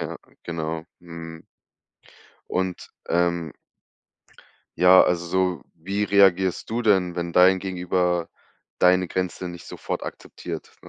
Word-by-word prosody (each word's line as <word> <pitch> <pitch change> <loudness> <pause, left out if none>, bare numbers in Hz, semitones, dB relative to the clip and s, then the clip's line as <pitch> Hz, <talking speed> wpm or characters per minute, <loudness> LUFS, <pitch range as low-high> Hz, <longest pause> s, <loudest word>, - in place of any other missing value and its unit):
Ja, - - -5 0.3
genau, 80 -1 -4 0.2
mhm. 85 -1 -10 1.1
Und, 95 -1 -3 0.2
ähm 85 -2 0 1.2
ja, 90 +1 +7
also, 85 -1 0
so 90 0 0
wie 95 +5 -2
reagierst 95 -2 +3
du 115 +2 -1
denn, 95 -6 +2
wenn 85 -1 -4
dein 95 +1 +6
Gegenüber 90 -2 -1 0.5
deine 90 0 +4
Grenze 90 0 -3
nicht 85 -1 -10
sofort - - -5
akzeptiert? - - -8
Ne, - - -15
90 Hz, 115 wpm, -24 LUFS, 85-95 Hz, 1.2 s, ja